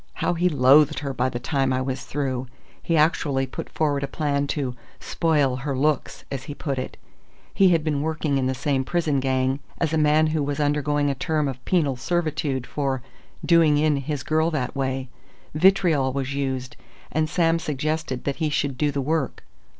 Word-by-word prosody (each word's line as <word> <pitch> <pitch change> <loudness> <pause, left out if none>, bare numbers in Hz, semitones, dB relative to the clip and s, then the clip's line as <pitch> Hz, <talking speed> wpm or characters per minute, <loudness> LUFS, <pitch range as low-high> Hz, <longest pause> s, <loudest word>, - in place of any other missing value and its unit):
How - - 0
he 175 +1 +2
loathed 140 0 +5
her 140 -2 -3
by 130 0 0
the 120 - -4
time 135 +1 0
I 130 - +1
was 130 0 -3
through... 130 -3 -2 0.3
he 165 - 0
actually 150 -3 +2
put 130 - -7
forward 145 -3 0
a 140 - -2
plan 140 0 -1
to 135 -4 -2 0.3
'spoil 145 -6 +1
her 135 +1 -3
looks,' 150 +1 -1
as 135 -2 -4
he 145 - -6
put 140 -4 -3
it. 130 - -6 0.6
He 195 -1 +5
had 165 -3 +3
been 150 -3 0
working 155 -2 0
in 130 - 0
the 130 - -1
same 135 0 0
prison 155 -2 0
gang 130 0 0 0.2
as 160 -1 -1
a 160 - +2
man 150 +1 +4
who 155 - +1
was 145 +1 -2
undergoing 145 0 +1
a - - 0
term 150 +3 -1
of 130 -1 -6
penal 150 -8 +1
servitude 155 -4 -1
for 135 -3 -2 0.4
'doing 165 -3 +5
in' 150 -1 +2
his 140 +1 -3
girl 160 +1 +1
that 150 -6 -2
way... 130 -1 -2 0.5
vitriol 160 -5 +3
was 135 0 -2
used, 130 -2 -3 0.4
and 155 0 0
Sam 165 0 +2
suggested 150 -3 -2
that 140 - -2
he 160 -2 0
should 140 -3 -1
do 150 - +2
the 140 -1 -2
work.... 150 -1 -1
145 Hz, 190 wpm, -24 LUFS, 135-155 Hz, 0.6 s, loathed